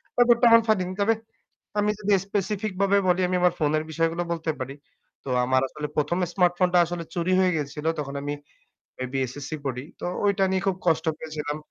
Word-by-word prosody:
ব্যাপারটা 240 0 +5
এমন 230 0 +8
ফানি। 215 -4 +3 0.2
তবে 220 +3 +4 0.7
আমি 205 0 +2
যদি 205 0 +1
specific 205 +1 -2
ভাবে 200 0 +4
বলি 180 +1 +3
আমি 180 - +1
আমার 180 -1 +4
ফোনের 155 0 +1
বিষয়গুলো 165 +2 0
বলতে 165 -1 -2
পারি। 130 +1 -5 0.5
তো - - -8 0.2
আমার 130 +1 +3
আসলে 150 +1 -5
১ম, 150 +4 +1
smartphone 180 0 +2
টা - - +7
আসলে 175 0 -5
চুরি 175 +1 0
হয়ে 185 -1 +3
গেছিল। 150 +1 -4
তখন 140 -2 -4
আমি 145 0 -2 0.6
maybe 130 +1 -4
SSC 140 +1 -8
পড়ি। 125 -1 -3 0.2
তো - - -5 0.2
ওইটা 200 -1 +2
নিয়ে 190 0 +1
খুব 190 - +2
কষ্ট 160 0 +2
পেয়েছিলাম। 150 -2 -4
170 Hz, 185 wpm, -25 LUFS, 150-195 Hz, 0.7 s, এমন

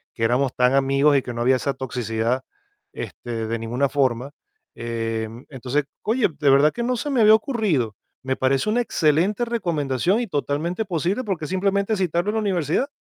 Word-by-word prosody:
que 115 - -3
éramos 125 +3 +2
tan 125 +1 +3
amigos 135 +2 +3
y 135 - +4
que 125 - -6
no 120 0 -4
había 130 +2 +4
esa 140 +1 -2
toxicidad, 120 -1 -2 0.5
este, 115 -2 -5
de 115 +1 -2
ninguna 120 +5 0
forma. 130 -1 0 0.4
Eh, 115 -1 -3 0.2
entonces, 135 +2 -2 0.2
oye, 225 +2 +2
de 145 -2 +3
verdad 140 +3 +5
que 240 - -4
no 245 +1 0
se 290 +4 -3
me 250 -4 +2
había 215 +1 +8
ocurrido. 200 - 0 0.3
Me 130 0 -1
parece 135 +6 +1
una 225 +3 +2
excelente 185 +3 +1
recomendación 175 - 0
y 240 - -1
totalmente 165 +5 -2
posible, 185 +6 -1
porque 190 -8 -3
es - - -7
simplemente 200 +3 +1
citarlo 180 0 0
en - - -7
la - - +2
universidad. 180 - 0
145 Hz, 185 wpm, -23 LUFS, 125-200 Hz, 0.5 s, había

